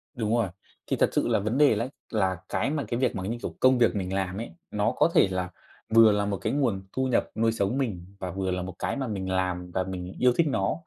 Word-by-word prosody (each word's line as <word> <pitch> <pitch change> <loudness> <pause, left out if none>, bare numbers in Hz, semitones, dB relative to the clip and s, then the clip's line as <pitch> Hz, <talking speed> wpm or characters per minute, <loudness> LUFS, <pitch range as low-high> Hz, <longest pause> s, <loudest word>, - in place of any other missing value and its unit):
Đúng 115 -2 0
rồi. 110 -6 +1 0.4
Thì - - 0
thật - - +3
sự - - +1
là - - +2
vấn 110 +6 -1
đề 145 -6 +5
lấy 115 +5 -2 0.2
là 95 -4 +1
cái - - 0
mà 150 -2 -1
cái 120 - -2
việc 130 - +1
mà, 95 - -3
như 110 +5 -3
kiểu, - - -5
công 130 0 +5
việc 120 -2 +3
mình 95 -1 -2
làm 95 -1 -2
ấy, 115 - -5 0.2
nó 105 0 +1
có 170 - +2
thể - - +6
là 90 -1 -2 0.4
vừa 115 -1 +7
là 105 0 +1
một 100 -1 -1
cái - - -1
nguồn 120 -9 0
thu 130 - 0
nhập 125 - +1
nuôi 115 0 +2
sống 110 +2 -1
mình 105 -11 -2
và 90 -2 -4
vừa 95 -1 -2
là 90 0 -1
một 90 +1 -6
cái 95 - -1
mà 135 -2 -2
mình 95 -4 -3
làm 90 -1 -1
và 95 +1 0
mình 90 0 -6
yêu 125 -1 +5
thích 170 - +4
nó. 95 -8 +1
105 Hz, 270 wpm, -27 LUFS, 95-120 Hz, 0.4 s, vừa